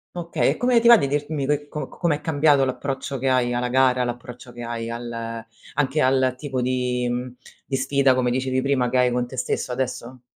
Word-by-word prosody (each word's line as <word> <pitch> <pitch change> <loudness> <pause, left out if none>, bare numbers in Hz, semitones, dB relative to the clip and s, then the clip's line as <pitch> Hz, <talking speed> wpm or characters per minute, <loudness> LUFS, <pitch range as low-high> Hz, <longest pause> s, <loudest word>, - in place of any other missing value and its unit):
Okay, 170 -1 0
e - - -1
come 245 -1 +3
ti 235 - +2
va 235 - +10
di 140 - 0
dirmi 145 0 -2
che 145 +1 -1
co 150 -2 -5
c - - -17
com'è 165 -4 +1
cambiato 150 -3 +3
l'approccio 135 +1 -4
che 135 +1 0
hai 125 -1 +2
alla 125 0 -1
gara, 125 0 +3
l'approccio 120 0 -7
che 120 0 -9
hai 115 -1 -4
al 115 -1 -5 0.3
anche 145 +1 +1
al 130 -1 +3
tipo 130 -2 -3
di 125 -1 -1
mhmm, 125 +1 -3 0.3
di 135 - -2
sfida, 135 0 +2
come 125 -1 +1
dicevi 130 +1 0
prima, 135 -3 +1
che 130 - 0
hai 125 -1 +3
con 125 0 -1
te 130 +1 -10
stesso 125 - -2
adesso? 125 -1 -4
130 Hz, 215 wpm, -23 LUFS, 125-140 Hz, 0.3 s, va